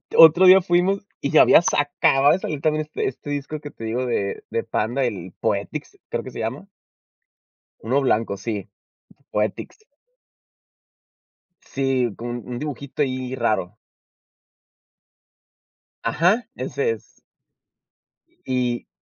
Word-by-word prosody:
Otro 165 +3 +8
día 185 +1 +9
fuimos 180 +3 +1 0.2
y 140 - -1
ya 155 - +7
había - - +7
sa 160 - +2
acababa 145 -1 +3
de 185 - 0
salir 150 -6 -4
también 155 0 +1
este 150 - -3
este 135 - -7
disco 145 +1 -4
que 145 0 -9
te 115 - -11
digo 120 +3 -2
de 100 -5 -2
de - - -1
Panda, 120 +5 -1
el 95 -6 -5
Poetics - - -3
creo - - -3
que - - -8
se - - -8
llama. 125 - -4 1.1
Uno 130 +6 0
blanco, 110 -6 +1
sí. 105 -3 -5 0.6
Poetics. 105 - -2 1.8
Sí, 130 -4 -1
con 120 +1 -6
un - - -9
un 120 - -4
dibujito 145 -1 -5
ahí 130 -1 -3
raro. 110 -5 -1 2.3
Ajá, 195 +9 +2
ese 450 +2 -2
es. - - -9 1.3
Y 125 -2 -1
135 Hz, 130 wpm, -22 LUFS, 120-155 Hz, 2.3 s, día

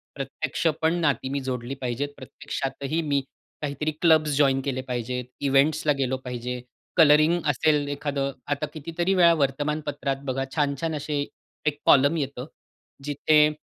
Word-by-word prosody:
प्रत्यक्षपण 155 +3 -1
नाती 140 -4 +1
मी 140 +1 -1
जोडली 130 0 -4
पाहिजेत, 130 +3 -2
प्रत्यक्षातही 140 +2 -4
मी 145 -3 +1 0.4
काहीतरी 150 +1 -2
क्लब्स 160 -3 +5
जॉइन 135 -2 +3
केले 130 -2 -1
पाहिजेत, 125 -1 -3 0.2
इव्हेंट्स 140 +3 +3
ला - - +6
गेलो 130 0 0
पाहिजे, 125 0 -4 0.4
कलरिंग 155 +2 +6
असेल 145 +1 +2
एखादं. 140 -1 -2 0.2
आता 145 +1 -1
कितीतरी 165 +4 -1
वेळा 170 -2 +6
वर्तमानपत्रात 145 -1 -1
बघा 135 0 -1
छान-छान 150 +1 0
असे 145 0 -2 0.4
एक 150 -1 0
कॉलमन 140 +4 +5
येतं, 140 -3 -3 0.6
जिथे 150 +1 +4
145 Hz, 130 wpm, -25 LUFS, 135-155 Hz, 0.6 s, ला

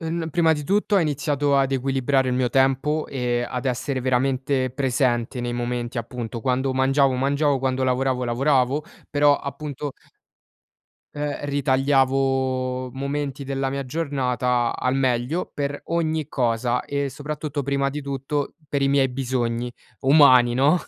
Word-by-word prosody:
uhm, 165 +1 -3
n 160 - -5
prima 165 0 +3
di 150 -2 -3
tutto 205 +4 +2
ho - - +5
iniziato 145 -2 +1
ad 135 -1 +2
equilibrare 135 0 +1
il 125 - 0
mio 125 -1 +1
tempo, 135 +4 +2
e 120 -2 -1
ad 125 +1 -4
essere 130 +2 -1
veramente 130 +1 0
presente 125 -2 0
nei 120 0 -3
momenti, 120 0 -3
appunto, 115 0 -5
quando 130 +3 0
mangiavo, 135 +1 +3
mangiavo, 140 +2 +1
quando 130 0 0
lavoravo 130 0 0
lavoravo, 130 +3 +1 0.3
però 145 -1 +4
appunto 140 0 -5 1.2
ehm, 145 0 -3
ritagliavo 135 -2 +1
momenti 140 +1 -3
della 135 0 -2
mia 140 0 -3
giornata 125 -4 0
al 130 +1 0
meglio 130 +5 0
per 145 0 -3
ogni 160 -3 -1
cosa, 120 -2 0
e 140 -1 -2
soprattutto, 150 0 -4
prima 140 0 0
di 150 +2 -5
tutto, 140 +1 -3
per 140 -1 -1
i 135 - +3
miei 140 -1 +3
bisogni 125 -2 -2 0.3
umani, 130 -4 +6
no, 140 +7 +4
135 Hz, 145 wpm, -23 LUFS, 125-145 Hz, 1.2 s, umani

